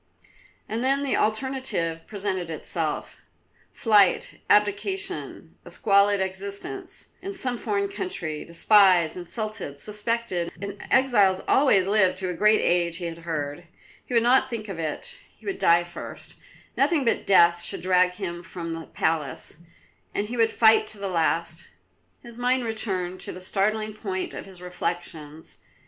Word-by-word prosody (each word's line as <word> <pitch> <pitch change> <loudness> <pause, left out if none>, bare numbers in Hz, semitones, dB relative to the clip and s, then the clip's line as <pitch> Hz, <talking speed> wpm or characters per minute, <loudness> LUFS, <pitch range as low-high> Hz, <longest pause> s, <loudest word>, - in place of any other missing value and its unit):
And 225 +3 -3
then 275 +2 +2
the 275 - 0
alternative 215 -8 -1
presented 190 -4 -3
itself; 160 - -3 0.5
flight, 205 -5 +3
abdication, 210 - 0
a - - -11
squalid 200 -1 +3
existence 200 - -5
in 390 +1 -6
some 255 -9 -1
foreign 400 - -1
country, 185 - -4
despised, 175 -1 +4
insulted, 185 -4 -4
suspected; 210 -2 -2
and 200 0 -6
exiles 210 -8 +4
always 230 -10 +4
lived 190 -2 +3
to 185 -1 -3
a - - -2
great 210 +5 +4
age 170 -1 +1
he 180 - -5
had 165 0 -5
heard. 160 0 -4 0.4
He 250 - -5
would 230 - +5
not 260 +2 +4
think 225 -3 -5
of 185 -4 -6
it; 165 - -4 0.2
he - - -20
would 385 -1 -3
die 170 +1 +5
first; 175 0 -9 0.4
nothing 310 -7 +2
but 230 - 0
death 175 -3 +5
should - - -4
drag 180 0 +3
him 175 -3 -5
from 170 -2 -6
the 165 -1 -7
palace, 155 -4 -2 0.6
and 210 +1 -1
he 245 - -4
would 225 -1 +3
fight 220 -1 +5
to 215 - -2
the 200 -1 -4
last. 170 0 0 0.6
His 235 -1 -10
mind 250 0 +1
returned 190 -5 -1
to - - -4
the 180 - -8
starting 215 +3 -1
point 190 -3 -4
of - - -7
his 185 -2 -13
reflections. 170 -3 -5
195 Hz, 150 wpm, -25 LUFS, 175-230 Hz, 0.6 s, would